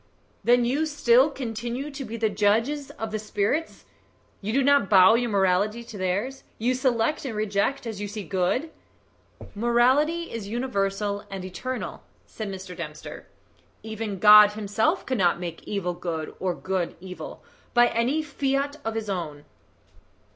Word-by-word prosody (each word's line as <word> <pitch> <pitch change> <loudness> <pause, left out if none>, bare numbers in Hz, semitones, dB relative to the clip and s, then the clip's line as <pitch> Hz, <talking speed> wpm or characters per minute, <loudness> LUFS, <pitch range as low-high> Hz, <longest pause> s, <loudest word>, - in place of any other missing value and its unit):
"Then 245 0 +4
you 285 +6 +1
still 275 -2 +4
continue 245 +1 -4
to 275 0 -6
be 230 -1 -6
the 225 -1 +1
judges 225 +8 +1
of 225 -1 -4
the 215 - -2
spirits? 215 +9 -2 0.6
You 205 +2 -3
do 270 +4 +2
not 280 -7 +4
bow 190 +1 +7
your 235 +1 +1
morality 200 +3 +1
to 230 - -11
theirs 205 +8 -2
you 240 +3 +1
select 255 +1 0
and 255 -6 -4
reject 215 +6 0
as 220 -3 -5
you 205 - -3
see 205 0 -6
good?" 195 - -1 0.8
"Morality 260 +9 +2
is 225 -3 -5
universal 205 -3 -1
and 190 -2 -6
eternal," 255 +7 -5 0.2
said 215 -2 -6
Mr. 190 -2 -7
Dempster. 155 -3 -8 0.6
"Even 220 -2 -4
God 210 +1 +8
himself 215 - 0
cannot 190 -10 +1
make 170 -2 -7
evil 185 -4 -2
good 170 -3 -4
or 185 -2 -1
good 185 -2 -2
evil 180 -3 -9 0.3
by 240 0 +7
any 250 +7 0
fiat 280 0 -1
of 225 0 -3
his 220 -1 -3
own." 160 -7 -4
220 Hz, 150 wpm, -25 LUFS, 195-255 Hz, 0.8 s, God